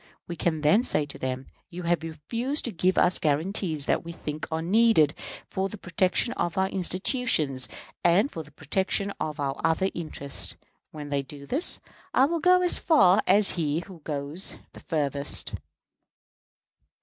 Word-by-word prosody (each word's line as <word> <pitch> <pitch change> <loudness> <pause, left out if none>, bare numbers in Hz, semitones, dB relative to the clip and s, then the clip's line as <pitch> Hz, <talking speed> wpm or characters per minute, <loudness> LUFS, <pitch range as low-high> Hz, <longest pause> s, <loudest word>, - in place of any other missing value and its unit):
We 170 - -5
can 160 -2 -1
then 155 +11 +4
say 150 - +3
to 145 - -10
them, 130 0 -3 0.2
'You 175 +1 -7
have 170 -1 +1
refused 230 - -3
to 240 - -2
give 185 0 +1
us 180 - +3
guarantees 155 0 -1
that - - +1
we 170 - -7
think 155 -2 -6
are 160 - -1
needed 195 -5 +4 0.3
for 190 +1 -2
the 215 - -8
protection 185 +5 0
of 170 0 -2
our 190 0 +3
institutions 185 - +1 0.3
and 180 +10 +4
for 165 - -5
the 150 - -13
protection 190 +7 -2
of 155 -1 -3
our 140 -1 -2
other 190 +4 +2
interests.' 140 - -3 0.3
When 150 -2 -8
they 140 -1 0
do 140 +1 -11
this, 280 - +1 0.4
I 265 - +6
will 335 +3 -1
go 360 +2 +5
as 355 - +3
far 205 - +5
as 200 +2 +6
he 150 +1 0
who 185 -2 -12
goes 145 +3 -4 0.2
the - - -11
farthest." 145 -3 -1
170 Hz, 165 wpm, -26 LUFS, 150-195 Hz, 0.4 s, I